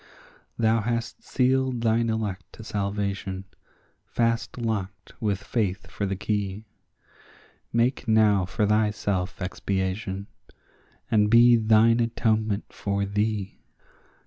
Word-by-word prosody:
Thou 115 -1 +3
hast 115 +1 -3
sealed 130 -1 +1
thine 115 0 +2
elect 100 -5 -3
to 115 - -11
salvation, 100 -2 -3 0.6
fast 115 0 -1
locked 100 -7 -4
with 105 -2 -1
faith 105 -5 -1
for 100 - -2
the 95 - -2
key; 100 +1 -2 1.1
Make 120 +2 +1
now 105 -4 +4
for 105 +3 0
thyself 105 -3 0
expiation, 95 +1 -2 0.9
and 105 -2 +4
be 120 +1 +7
thine 115 +1 +4
atonement 110 -3 0
for 100 0 -1
thee. 105 0 -2
105 Hz, 105 wpm, -26 LUFS, 100-115 Hz, 1.1 s, be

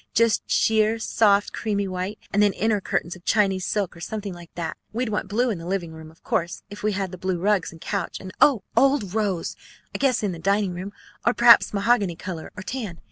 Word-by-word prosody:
Just 230 0 +3
sheer, 220 0 +3
soft, 205 -2 +2
creamy 200 -3 -1
white. 185 +3 -4 0.2
And 205 - +3
then 205 -1 +4
inner 210 +1 +1
curtains 170 -1 -2
of 180 - -16
Chinese 195 -4 +2
silk 205 -5 -1
or 170 - -12
something 205 0 -4
like 175 -1 -12
that. 165 -2 -3 0.2
We'd 235 +1 -2
want 205 -2 -2
blue 235 +5 +1
in 190 - -4
the 165 - -8
living 180 -3 -2
room, 160 0 -10
of 160 - -22
course, 170 +1 -2
if 205 - -8
we 210 0 0
had 190 -2 -2
the 185 - -9
blue 185 -1 -1
rugs 195 0 +1
and 165 - -13
couch, 190 +1 -3
and 185 - -8
oh! 250 -9 +5
old 270 -9 +3
rose, 200 -6 -1 0.4
I - - -4
guess, 255 -5 +2
in 205 - 0
the 170 - -7
dining 195 +2 +1
room, 185 +3 -6 0.3
or 235 - +2
perhaps 235 -1 +7
mahogany 200 -3 +2
color 170 -2 -6
or 185 - -6
tan. 215 -7 -5
200 Hz, 225 wpm, -24 LUFS, 180-215 Hz, 0.4 s, perhaps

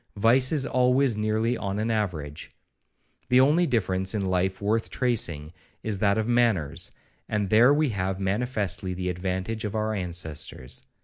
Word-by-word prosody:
Vice 125 +5 +4
is 145 -4 +1
always 125 -1 +2
nearly 110 +3 0
on 100 -3 -3
an 110 +2 -1
average: 85 -9 -3 0.8
The 125 0 +5
only 155 +6 +4
difference 95 -4 0
in 100 -2 -1
life 95 0 0
worth 110 +2 0
tracing, 85 - -1 0.3
is 105 -3 -2
that 100 0 +2
of 110 0 0
manners, 90 -10 +1 0.4
and 105 -2 -1
there 115 +5 +6
we 150 0 +2
have 95 -3 -2
manifestly 100 -2 -1
the 90 0 -3
advantage 95 +4 -3
of 105 0 -4
our 110 0 -1
ancestors. 85 -8 -4
105 Hz, 150 wpm, -26 LUFS, 95-120 Hz, 0.8 s, there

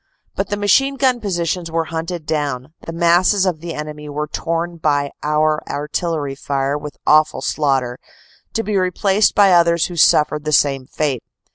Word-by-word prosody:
But - - -2
machine 270 +7 +3
gun 255 -3 +1
positions 175 -3 -2
were 165 0 0
hunted 165 0 -4
down, 145 -3 -3
the - - -3
masses 175 +4 +3
of 175 -4 -1
the 165 0 -6
enemy 150 0 -7
were 150 +1 -3
torn 165 +3 -3
by 145 -3 0
our 150 0 +1
artillery 150 -1 -2
fire 140 0 -2
with 150 0 -7
awful 155 -3 +3
slaughter, 135 -4 0 0.5
to 225 - -1
be 210 -1 -1
replaced 190 +2 +2
by 200 -2 +5
others 170 -1 +4
who - - -7
suffered 150 -2 +3
the 155 - -2
same 135 -2 +2
fate. 145 -5 -2
160 Hz, 160 wpm, -19 LUFS, 150-175 Hz, 0.5 s, by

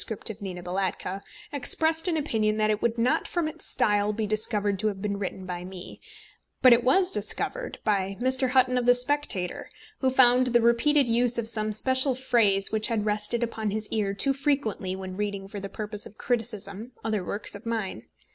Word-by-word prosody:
of 215 0 -12
Nina 180 -3 -6
Balatka, 190 +1 -3 0.3
expressed 320 +5 +2
an 335 -3 +1
opinion 220 -7 0
that 215 0 +2
it 210 - -1
would 235 0 0
not 235 +2 +1
from 345 -3 -1
its 310 - -6
style 205 0 +2
be 215 +1 -2
discovered 210 -2 0
to 215 - 0
have 200 -2 -2
been 200 0 -3
written 190 -1 -5
by 180 -1 -5
me; 185 0 -10 0.6
but 255 -2 +9
it 235 0 +3
was 365 +8 +3
discovered - - -2
by 195 -2 0
Mr. 260 +1 +1
Hutton 255 -1 +3
of 245 - -2
the 245 - +7
Spectator, 250 -8 -1 0.3
who 265 - +2
found 255 -1 +5
the 240 -1 +3
repeated 250 +4 +3
use 240 +1 +2
of 230 -1 -2
some 215 -1 -1
special 260 +4 +1
phrase 225 -6 +2
which 220 0 0
had 225 -4 -1
rested 210 +3 0
upon 220 -2 -2
his 215 +1 -3
ear 200 -3 -1
too 275 +7 +1
frequently 270 -9 -1
when 190 -1 -7
reading 200 -2 -3
for 205 +1 -7
the 195 0 -6
purpose 210 0 -6
of 210 - -18
criticism 225 -1 -4
other 215 -4 -1
works 205 +3 -3
of 200 +3 -7
mine. 215 - -3
220 Hz, 195 wpm, -27 LUFS, 200-250 Hz, 0.6 s, but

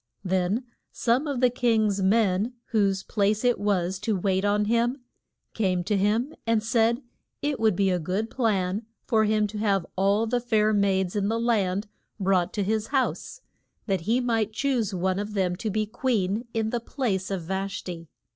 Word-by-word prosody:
Then 190 +5 0 0.3
some 250 +6 +1
of 275 -4 -2
the 250 -1 +4
king's 220 -5 +1
men, 205 +2 +2 0.2
whose 195 -3 +2
place 210 +2 0
it 245 -1 +3
was 190 -3 0
to 215 +1 0
wait 190 0 0
on 205 0 +2
him, 235 +4 +1 0.6
came 185 -5 0
to 205 +3 0
him 215 +9 +1
and 225 -2 +2
said 230 +3 +2 0.4
it 290 -1 -1
would 220 -4 +3
be 195 0 +2
a 180 - +1
good 190 +7 -2
plan 210 -3 0 0.2
for 220 -1 +3
him 215 0 +2
to 210 0 -5
have 200 -4 +1
all 200 +4 +2
the 245 +2 0
fair 215 -3 +2
maids 190 -2 +1
in 200 -1 +1
the 225 +2 0
land 210 -4 +1 0.3
brought 185 -2 +2
to 205 - -1
his 215 +2 -1
house, 275 - -1 0.4
that 195 -5 0
he 240 +2 +3
might 225 -4 0
choose 245 -3 0
one 185 0 0
of 210 +1 -5
them 185 -2 +1
to 220 +2 -3
be 215 +1 0
queen, 220 -1 -1
in 220 -1 -1
the 240 - 0
place 225 -6 -2
of 190 -4 -3
Vash 195 +3 -3
ti. 170 -2 -7
210 Hz, 185 wpm, -26 LUFS, 190-230 Hz, 0.6 s, the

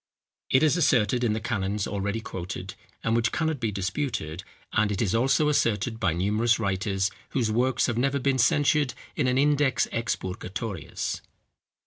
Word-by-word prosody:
It 130 +3 +4
is 155 +2 +4
asserted 125 -6 +3
in 115 -3 +2
the 110 - -1
canons 105 -3 -1
already 100 +2 -2
quoted, 90 -1 -6 0.3
and 115 - +1
which 115 -1 +2
cannot 160 -3 -1
be 115 -3 -1
disputed; 95 - -3 0.3
and 105 0 +2
it 100 - -2
is 105 -6 +1
also 135 +6 +3
asserted 115 -5 +1
by 100 -7 +1
numerous 105 +7 +2
writers, 95 -2 0 0.3
whose 115 -4 +1
works 125 +3 +2
have 120 -2 -1
never 140 +2 +1
been 135 -1 +1
censured 145 +2 +3 0.2
in 135 - +1
an 125 0 +2
Index 145 -1 +3
Expurgatorius. 100 - -3
115 Hz, 155 wpm, -26 LUFS, 100-130 Hz, 0.3 s, It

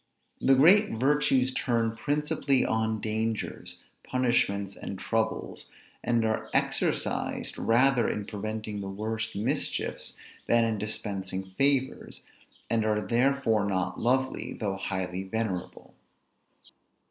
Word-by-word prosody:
The 135 - +5
great 190 +10 +6
virtues 135 +1 +2
turn 115 -3 0
principally 145 0 +1
on 110 -1 0
dangers, 110 0 -3 0.2
punishments, 100 -6 0
and 100 - -6
troubles, 110 +2 -2 0.3
and 120 -2 +2
are 110 0 -1
exercised, - - -1
rather 125 +1 +3
in 105 - -3
preventing 110 0 -4
the 100 - -5
worst 110 +2 -3
mischiefs, 125 +8 -2 0.3
than 115 0 +4
in 110 -2 -1
dispensing 95 -3 -4
favors; 135 0 0 0.4
and 115 -1 +1
are 110 -1 +1
therefore 120 -3 +2
not 95 -2 -1
lovely, 130 +2 0
though 100 -3 -2
highly 95 -2 -3
venerable. 95 -2 -4
110 Hz, 110 wpm, -28 LUFS, 100-130 Hz, 0.4 s, great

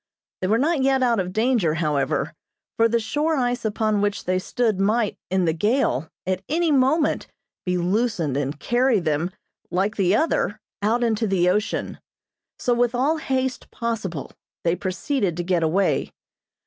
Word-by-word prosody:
They 185 - 0
were 215 +4 +3
not 300 +3 +1
yet 265 0 +3
out 235 -3 +2
of 180 -1 -2
danger, 220 -7 +2
however, 150 -2 0 0.4
for 230 0 +3
the 235 +1 +2
shore 295 +8 0
ice 245 -1 0
upon 215 -1 0
which 205 0 -1
they 185 0 +1
stood 220 +1 0
might, 215 +2 +1
in 185 -1 +1
the 160 - +2
gale, 205 - +1 0.2
at 185 0 -1
any 330 +1 +2
moment 285 +3 +2 0.4
be 180 0 +1
loosened 180 - 0
and 140 +1 -2
carry 245 -2 +2
them, 160 0 0 0.4
like 195 +4 0
the 190 0 +3
other, 215 -7 +1 0.2
out 225 +4 +1
into 225 -1 +1
the 185 -3 +2
ocean. 210 +3 -2 0.6
So 245 - +1
with 240 0 +1
all 285 +6 +2
haste 260 -4 -2
possible, 215 - -4 0.3
they 170 0 +2
proceeded 185 - -1
to 175 - -1
get 175 -1 +1
away. 165 +5 +1
215 Hz, 160 wpm, -23 LUFS, 180-245 Hz, 0.6 s, were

